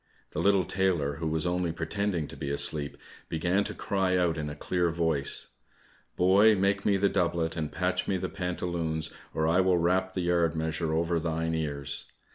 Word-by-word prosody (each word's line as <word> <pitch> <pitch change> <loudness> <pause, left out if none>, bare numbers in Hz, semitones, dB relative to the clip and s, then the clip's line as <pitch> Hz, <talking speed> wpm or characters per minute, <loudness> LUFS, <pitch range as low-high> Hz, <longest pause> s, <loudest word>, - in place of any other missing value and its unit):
The - - -4
little 100 -2 +3
tailor, 85 -7 0
who 80 - -3
was 80 +1 -1
only 90 -1 0
pretending 85 0 -2
to - - -9
be 70 - -4
asleep, 70 0 0 0.3
began 90 +5 +1
to - - -5
cry 95 -2 0
out 85 -2 +2
in 75 -2 -3
a 75 - -6
clear 90 +3 0
voice, 80 -4 +1 0.7
"Boy, 100 +4 +5
make 100 0 +1
me 100 -1 +4
the 100 +1 +3
doublet 85 -4 0
and 80 -2 -3
patch 90 +1 -1
me 95 - +1
the - - -3
pantaloons, 85 -3 -3 0.2
or 80 - -1
I 85 +3 +4
will 95 -1 +3
rap 95 +2 +1
the 95 - -2
yard 85 -2 +1
measure 80 0 -1
over 85 +1 +1
thine 80 0 -1
ears. 70 -4 -1
85 Hz, 185 wpm, -28 LUFS, 80-95 Hz, 0.7 s, Boy